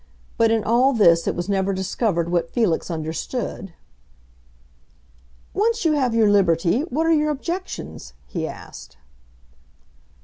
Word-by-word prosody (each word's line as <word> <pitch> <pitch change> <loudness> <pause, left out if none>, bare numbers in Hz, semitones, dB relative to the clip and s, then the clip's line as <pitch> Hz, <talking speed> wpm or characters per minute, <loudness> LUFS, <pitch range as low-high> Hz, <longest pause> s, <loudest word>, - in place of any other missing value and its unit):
But 225 -1 +3
in 225 -1 +1
all 245 +5 +3
this 170 -7 +4
it - - 0
was 175 +1 -4
never 195 -1 0
discovered 185 -2 -1
what 170 -1 0
Felix 215 -10 0
understood. 165 +6 -4 1.8
"Once 450 -1 0
you 320 - +4
have 260 -6 +1
your 225 -2 +4
liberty, 180 - +2
what 320 +1 -1
are 330 - +4
your 305 -1 +2
objections?" 340 +6 -5
he 165 -4 -4
asked. - - -11
215 Hz, 130 wpm, -22 LUFS, 175-275 Hz, 1.8 s, this